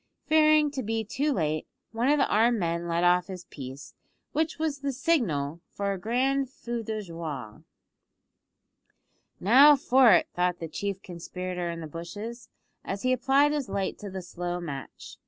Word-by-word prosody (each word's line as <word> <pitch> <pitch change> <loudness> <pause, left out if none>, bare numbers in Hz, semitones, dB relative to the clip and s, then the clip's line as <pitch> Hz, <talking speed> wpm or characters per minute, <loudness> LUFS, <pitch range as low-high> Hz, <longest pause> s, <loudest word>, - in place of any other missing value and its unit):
Fearing 310 -1 +4
to 275 -2 -3
be 225 -1 -2
too 285 +8 -1
late, 155 - -1 0.2
one 235 +4 0
of 295 - +4
the 275 - +3
armed 230 +3 +3
men 170 -2 -2
let 170 +1 0
off 180 0 +4
his 185 -2 -8
piece, 135 0 -9 0.4
which 315 +1 -1
was 310 -2 -2
the 280 0 -2
signal 180 - 0
for 200 0 -2
a 195 - -6
grand 260 +6 0
feu 240 -3 -5
de 215 -1 -4
joie. 155 - -7 1.8
"Now 270 +9 +7
for 260 -3 +5
it," 175 - +4
thought 180 0 0
the 165 - -6
chief 195 +4 -4
conspirator 180 0 -5
in 170 0 -5
the - - -5
bushes, 205 +9 -8 0.3
as 195 0 -5
he 255 0 +3
applied 270 +3 +3
his 290 -7 -2
light 195 -1 -2
to 205 - -7
the 190 -1 -6
slow 175 0 -4
match. 140 -6 -8
200 Hz, 170 wpm, -27 LUFS, 170-265 Hz, 1.8 s, Now